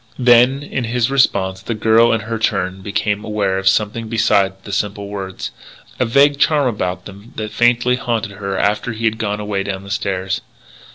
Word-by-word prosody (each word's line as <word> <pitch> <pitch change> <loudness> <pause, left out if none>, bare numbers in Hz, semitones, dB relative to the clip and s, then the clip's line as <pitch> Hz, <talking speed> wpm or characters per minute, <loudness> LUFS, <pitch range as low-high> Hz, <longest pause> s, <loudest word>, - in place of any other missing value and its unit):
Then, 125 +2 +4
in 130 -3 -3
his 120 +2 0
response, 95 -8 +1
the 115 +4 -4
girl 110 +2 +4
in 115 - +1
her 115 +1 -4
turn 95 -3 -1
became 105 +1 -2
aware 100 -3 -1
of 95 - -3
something 105 +3 +1
beside 100 -4 +1
the 100 - -8
simple 100 0 -2
words 95 -2 -6 0.5
a 125 - +2
vague 140 +4 +4
charm 150 -2 +3
about 90 -5 -3
them 100 +3 -12
that 110 -1 -4
faintly 120 +1 +2
haunted 115 -4 -2
her 100 -1 -4
after 105 +4 0
he 115 +1 -4
had 110 0 0
gone 105 -2 -2
away 105 -2 -2
down 95 -1 -4
the 100 - -9
stairs. 95 -2 -2
105 Hz, 185 wpm, -18 LUFS, 100-115 Hz, 0.5 s, Then